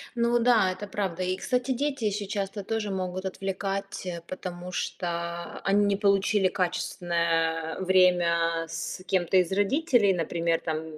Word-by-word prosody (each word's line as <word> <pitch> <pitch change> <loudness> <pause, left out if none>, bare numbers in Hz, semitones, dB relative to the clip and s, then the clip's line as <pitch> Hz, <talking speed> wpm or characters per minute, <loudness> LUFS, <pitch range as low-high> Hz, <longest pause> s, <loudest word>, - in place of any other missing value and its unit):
Ну 235 0 +2
да, 230 -5 +4
это 185 +3 -6
правда. 185 -3 -2
И, 185 0 0
кстати, 250 +5 -1
дети 275 0 -1
ещё 205 0 -1
часто 200 0 -3
тоже 215 0 -2
могут 185 0 -3
отвлекать, 195 +1 -3
э, 175 -2 -4
потому 180 -1 -6
что 175 0 -3 0.6
они 205 +1 +4
не 200 0 +2
получили 200 -1 +3
качественное 170 -3 -1
время 175 -3 +3
с 185 - -5
кем-то 185 -1 +2
из 180 -1 +3
родителей. 210 - +3
Например 170 -1 0
там, 160 -1 -2
190 Hz, 140 wpm, -27 LUFS, 175-205 Hz, 0.6 s, да